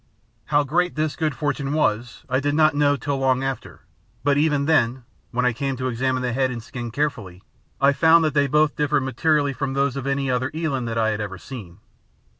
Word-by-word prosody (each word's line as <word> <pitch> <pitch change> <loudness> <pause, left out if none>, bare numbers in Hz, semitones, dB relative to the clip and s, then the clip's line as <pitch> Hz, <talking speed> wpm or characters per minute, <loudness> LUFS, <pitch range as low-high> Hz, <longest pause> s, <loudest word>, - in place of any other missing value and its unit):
How 145 +2 +2
great 175 +5 0
this 155 0 -1
good 155 -3 -1
fortune 145 -2 -2
was 120 -6 -1
I 130 0 +1
did 145 +1 0
not 155 0 +4
know 145 0 +3
till 140 +1 -3
long 130 -1 +1
after; 135 -3 -5 0.4
but 140 0 +3
even 145 -1 +2
then, 130 -5 +2 0.3
when 125 +1 -1
I 125 - +2
came 135 +3 -3
to 130 +1 -2
examine 130 +1 -1
the 125 -1 -1
head 130 +1 +1
and 120 -3 -6
skin 120 0 -6
carefully, 115 -9 -3 0.4
I 140 +1 +4
found 160 +3 +5
that 155 - 0
they 145 -1 +3
both 150 +2 +2
differed 145 -2 +1
materially 145 +1 +1
from 135 0 -3
those 140 -1 +1
of 135 -1 -4
any 140 0 0
other 130 0 0
eland 140 -7 -2
that 115 0 -3
I 110 -1 +2
had 110 0 -2
ever 100 -2 -5
seen. 100 -6 -10
135 Hz, 215 wpm, -23 LUFS, 125-145 Hz, 0.4 s, found